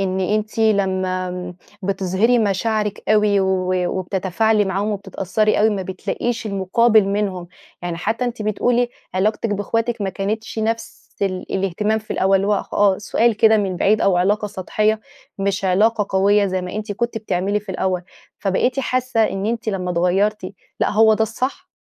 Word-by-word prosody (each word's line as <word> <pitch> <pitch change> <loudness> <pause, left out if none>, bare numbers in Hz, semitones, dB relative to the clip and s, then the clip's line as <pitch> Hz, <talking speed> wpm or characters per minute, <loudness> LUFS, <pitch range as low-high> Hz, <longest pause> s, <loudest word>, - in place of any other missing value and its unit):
إن 190 -1 -1
أنتِ 215 +3 -1
لمّا 190 -4 +1
آمم 180 0 -6 0.3
بتِظهرِي 195 +5 +1
مشاعرِك 210 0 0
أوي 210 -2 +4
و 185 -1 0 0.3
وبتتفاعلي 195 +4 +1
معاهم 195 +2 -1
وبتتأثَّري 200 +1 0
أوي، 220 +1 +4
ما 195 -2 -2
بتلاقيش 220 +5 -3
المُقابل 210 +2 +3
منهم، 195 -4 -2 0.3
يعني 175 -1 -3
حتى 225 +8 -1
أنتِ 240 -2 -3
بتقولي 240 +3 +1 0.3
علاقتِك 210 +4 0
بإخواتِك 225 +3 -1
ما 190 - -1
كانتش 215 +4 -4
نفس 225 +1 -3 0.2
ال 185 -2 -2
الإهتمام 195 +3 0
في 215 - -16
الأول، 195 +1 +3
اللي 195 +1 0
هو 210 - +3 0.2
آه، 200 -2 +3
سؤال 225 +1 +1
كده 220 0 +5
من 195 -3 -1
بعيد 210 +4 +2
أو 190 -2 +3
علاقة 205 +4 +1
سطحيَّة، 215 +3 0 0.4
مش 195 0 -1
علاقة 210 +3 +2
قويَّة 200 +1 +3
زي 185 -1 -2
ما 180 - -6
أنتِ 210 0 -4
كنتِ 235 +1 -2
بتعملي 205 0 -1
في 210 - -24
الأول، 185 -1 -1 0.4
فبقيتِ 245 +7 0
حاسَّة 255 -3 0
إن 195 0 -2
أنتِ 230 -1 -2
لمّا 185 -3 -2
اتغيَّرتِ، 185 +3 0 0.3
لأ - - +2
هو 220 +1 +5
ده 220 - 0
الصح؟ 255 - -3
205 Hz, 160 wpm, -20 LUFS, 190-220 Hz, 0.4 s, كده